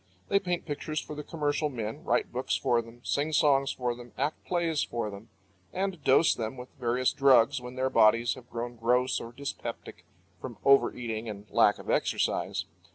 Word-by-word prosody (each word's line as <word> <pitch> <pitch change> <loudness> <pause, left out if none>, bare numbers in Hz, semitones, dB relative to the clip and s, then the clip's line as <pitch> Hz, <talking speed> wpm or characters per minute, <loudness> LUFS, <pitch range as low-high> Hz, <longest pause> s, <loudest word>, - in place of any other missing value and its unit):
They 200 - +4
paint 180 -3 -2
pictures 155 0 -3
for 150 - -7
the 150 - -5
commercial 150 -1 -1
men, 110 -5 -5
write - - 0
books - - -1
for 120 -1 +2
them, 115 +1 -15
sing 150 +2 -1
songs 140 -2 +3
for 125 -1 -2
them, 120 0 -12
act 145 +4 -2
plays 170 -4 0
for 115 -3 -3
them, 100 +3 -11 0.4
and 190 -4 -2
dose 135 +5 +5
them 115 +2 -4
with 125 +1 -9
various 125 +1 +1
drugs 135 -2 +4
when 125 +1 -8
their 130 0 0
bodies 115 +2 +4
have 125 -2 -13
grown 120 +1 -5
gross 125 +3 +2
or 115 - -8
dyspeptic 140 +3 -7 0.4
from - - -8
overeating 120 -4 +2
and 105 -1 -8
lack - - +4
of - - -5
exercise. - - 0
130 Hz, 180 wpm, -29 LUFS, 115-145 Hz, 0.4 s, dose